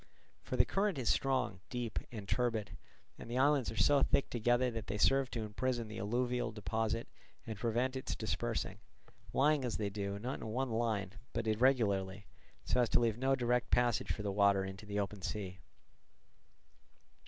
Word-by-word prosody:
For -, -, -4 dB
the -, -, +6 dB
current 195 Hz, -4 st, 0 dB
is 125 Hz, -4 st, 0 dB
strong, 125 Hz, -7 st, +1 dB
deep, 120 Hz, -3 st, -2 dB
and 105 Hz, -4 st, -7 dB
turbid, 110 Hz, -5 st, 0 dB, 0.4 s
and -, -, -9 dB
the 120 Hz, -, -2 dB
islands 140 Hz, -2 st, +3 dB
are 110 Hz, -, -7 dB
so 145 Hz, -1 st, +5 dB
thick 140 Hz, -, +2 dB
together 120 Hz, +2 st, +2 dB
that 115 Hz, -2 st, -5 dB
they 105 Hz, +2 st, -2 dB
serve 135 Hz, +4 st, +3 dB
to 115 Hz, -3 st, -3 dB
imprison 120 Hz, +2 st, -2 dB
the 110 Hz, -, -6 dB
alluvial 120 Hz, +4 st, 0 dB
deposit 110 Hz, +1 st, -2 dB, 0.4 s
and 110 Hz, -, -4 dB
prevent 120 Hz, +5 st, 0 dB
its 130 Hz, -, -3 dB
dispersing, -, -, -2 dB, 0.5 s
lying, 145 Hz, +1 st, +3 dB
as 120 Hz, -3 st, -2 dB
they 105 Hz, -2 st, -2 dB
do, 100 Hz, 0 st, -3 dB
not 125 Hz, +6 st, -4 dB
in -, -, -6 dB
one 125 Hz, +3 st, -1 dB
line, 110 Hz, -4 st, 0 dB, 0.2 s
but 115 Hz, 0 st, -2 dB
irregularly, 105 Hz, -5 st, +2 dB, 0.4 s
so 125 Hz, -, +2 dB
as 120 Hz, -, +2 dB
to -, -, +5 dB
leave 115 Hz, -1 st, +1 dB
no 135 Hz, +1 st, +3 dB
direct 125 Hz, -1 st, +1 dB
passage 120 Hz, -3 st, +2 dB
for 105 Hz, -, -4 dB
the 100 Hz, -, -1 dB
water 100 Hz, -1 st, +3 dB
into 95 Hz, +2 st, -8 dB
the 105 Hz, 0 st, -1 dB
open 100 Hz, 0 st, -3 dB
sea. 95 Hz, -1 st, -4 dB
115 Hz, 175 wpm, -35 LUFS, 105-125 Hz, 0.5 s, the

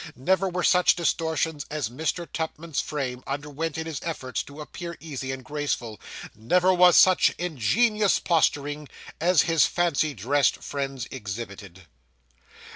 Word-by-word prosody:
Never 190 Hz, +9 st, +1 dB
were 180 Hz, 0 st, -2 dB
such 180 Hz, -1 st, +4 dB
distortions 160 Hz, -3 st, -1 dB
as 150 Hz, -6 st, -2 dB
Mr. 160 Hz, +7 st, -3 dB
Tupman's 160 Hz, -1 st, -3 dB
frame 130 Hz, -4 st, -4 dB
underwent 145 Hz, +3 st, -4 dB
in 160 Hz, -, -3 dB
his 160 Hz, -3 st, -4 dB
efforts 135 Hz, -6 st, -3 dB
to 145 Hz, +2 st, -12 dB
appear 170 Hz, +3 st, -7 dB
easy 135 Hz, -4 st, -5 dB
and 130 Hz, 0 st, -6 dB
graceful 145 Hz, -7 st, -3 dB, 0.3 s
never 180 Hz, -, +2 dB
was 180 Hz, -1 st, +6 dB
such 185 Hz, -1 st, +6 dB
ingenious 195 Hz, -, +2 dB
posturing, 145 Hz, -3 st, 0 dB, 0.3 s
as 175 Hz, -1 st, +4 dB
his 165 Hz, -2 st, +3 dB
fancy 155 Hz, -4 st, 0 dB
dressed 135 Hz, +7 st, +1 dB
friends 135 Hz, -3 st, -4 dB
exhibited. 100 Hz, -5 st, -7 dB
150 Hz, 130 wpm, -25 LUFS, 135-170 Hz, 0.3 s, was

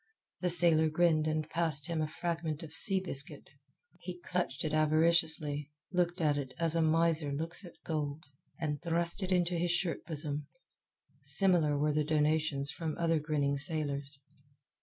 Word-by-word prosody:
The 180 Hz, -, 0 dB
sailor 165 Hz, -2 st, +4 dB
grinned 155 Hz, -1 st, +2 dB
and 155 Hz, 0 st, -1 dB
passed 160 Hz, -4 st, +3 dB
him 165 Hz, -2 st, -2 dB
a 155 Hz, -, 0 dB
fragment 165 Hz, -1 st, -3 dB
of 155 Hz, -1 st, -9 dB
sea 195 Hz, +3 st, +5 dB
biscuit. 150 Hz, -5 st, -4 dB, 0.5 s
He 180 Hz, -1 st, -7 dB
clutched 175 Hz, -4 st, -2 dB
it 155 Hz, -, -2 dB
avariciously, 155 Hz, -2 st, +2 dB, 0.2 s
looked 175 Hz, 0 st, 0 dB
at 150 Hz, -3 st, +2 dB
it 130 Hz, -2 st, -6 dB
as 165 Hz, -1 st, +1 dB
a 165 Hz, -, +1 dB
miser 160 Hz, -1 st, +2 dB
looks 165 Hz, +7 st, -1 dB
at 175 Hz, -, -11 dB
gold, 150 Hz, -1 st, -3 dB, 0.4 s
and 150 Hz, -3 st, -2 dB
thrust 170 Hz, +2 st, -1 dB
it 190 Hz, 0 st, -3 dB
into 175 Hz, -1 st, +1 dB
his 175 Hz, +1 st, 0 dB
shirt 175 Hz, -1 st, -1 dB
bosom. 150 Hz, -2 st, -4 dB, 0.7 s
Similar 175 Hz, -7 st, +3 dB
were 150 Hz, +1 st, +1 dB
the 150 Hz, 0 st, +1 dB
donations 150 Hz, -2 st, +1 dB
from 160 Hz, 0 st, -4 dB
other 165 Hz, -1 st, +1 dB
grinning 145 Hz, -2 st, -1 dB
sailors. 145 Hz, -3 st, -3 dB
160 Hz, 160 wpm, -32 LUFS, 150-170 Hz, 0.7 s, sea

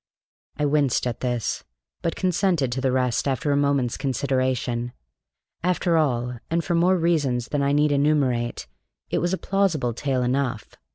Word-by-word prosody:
I 150 Hz, -, +1 dB
winced 145 Hz, -4 st, +2 dB
at 120 Hz, -2 st, -2 dB
this, 120 Hz, -3 st, -2 dB, 0.4 s
but 165 Hz, -, -1 dB
consented 180 Hz, -7 st, +1 dB
to 130 Hz, +2 st, -2 dB
the 130 Hz, 0 st, +1 dB
rest 125 Hz, 0 st, +1 dB
after 135 Hz, +2 st, 0 dB
a -, -, +3 dB
moment's 140 Hz, -4 st, +1 dB
consideration. 130 Hz, -2 st, -1 dB, 0.7 s
After 180 Hz, -1 st, +1 dB
all, 125 Hz, -6 st, 0 dB
and 165 Hz, +1 st, 0 dB
for 175 Hz, -, -1 dB
more 180 Hz, +2 st, +3 dB
reasons 145 Hz, -8 st, +1 dB
that 145 Hz, -, 0 dB
I 140 Hz, 0 st, +2 dB
need 145 Hz, +1 st, +3 dB
enumerate, 140 Hz, -, +1 dB, 0.5 s
it -, -, +1 dB
was 175 Hz, -, 0 dB
a 190 Hz, -, 0 dB
plausible 180 Hz, -13 st, 0 dB
tale 130 Hz, +1 st, -1 dB
enough. 125 Hz, -3 st, -1 dB
140 Hz, 160 wpm, -24 LUFS, 125-160 Hz, 0.7 s, a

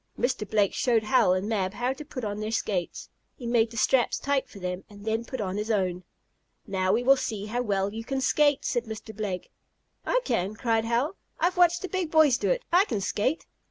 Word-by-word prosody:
Mr. 240 Hz, -5 st, -1 dB
Blake 205 Hz, -3 st, +2 dB
showed 235 Hz, -3 st, +2 dB
Hal 235 Hz, -3 st, +4 dB
and 185 Hz, +2 st, -1 dB
Mab 200 Hz, -3 st, -1 dB
how 245 Hz, +2 st, 0 dB
to 270 Hz, -, -9 dB
put 270 Hz, -4 st, -7 dB
on 205 Hz, -1 st, -3 dB
their 215 Hz, 0 st, -3 dB
skates. 200 Hz, -5 st, -2 dB, 0.3 s
He 245 Hz, -, -10 dB
made 235 Hz, -1 st, +2 dB
the 230 Hz, -, -10 dB
straps 240 Hz, +3 st, +3 dB
tight 275 Hz, -2 st, -1 dB
for -, -, -13 dB
them, 180 Hz, 0 st, -4 dB
and 205 Hz, 0 st, -13 dB
then 225 Hz, +1 st, 0 dB
put 260 Hz, +2 st, -6 dB
on 195 Hz, -2 st, -2 dB
his 210 Hz, +2 st, -3 dB
own. 185 Hz, -4 st, 0 dB, 0.6 s
"Now 190 Hz, -2 st, 0 dB
we 230 Hz, +4 st, +2 dB
will 270 Hz, +2 st, +6 dB
see 210 Hz, -5 st, -3 dB
how 240 Hz, +3 st, -2 dB
well 200 Hz, -3 st, 0 dB
you 225 Hz, +1 st, -5 dB
can 270 Hz, +3 st, -2 dB
skate," 290 Hz, +2 st, +2 dB
said 240 Hz, -1 st, 0 dB
Mr. 220 Hz, -1 st, -8 dB
Blake. 195 Hz, -3 st, -4 dB, 0.5 s
"I -, -, +2 dB
can!" 195 Hz, -, -1 dB
cried 225 Hz, 0 st, 0 dB
Hal. 245 Hz, +11 st, 0 dB, 0.2 s
"I've 360 Hz, +1 st, +2 dB
watched 350 Hz, 0 st, +4 dB
the -, -, -2 dB
big 370 Hz, -3 st, -2 dB
boys 310 Hz, -5 st, +5 dB
do -, -, 0 dB
it. -, -, +1 dB
I 370 Hz, +3 st, +6 dB
can 215 Hz, -, -2 dB
skate!" 215 Hz, -, -1 dB
225 Hz, 225 wpm, -27 LUFS, 205-265 Hz, 0.6 s, will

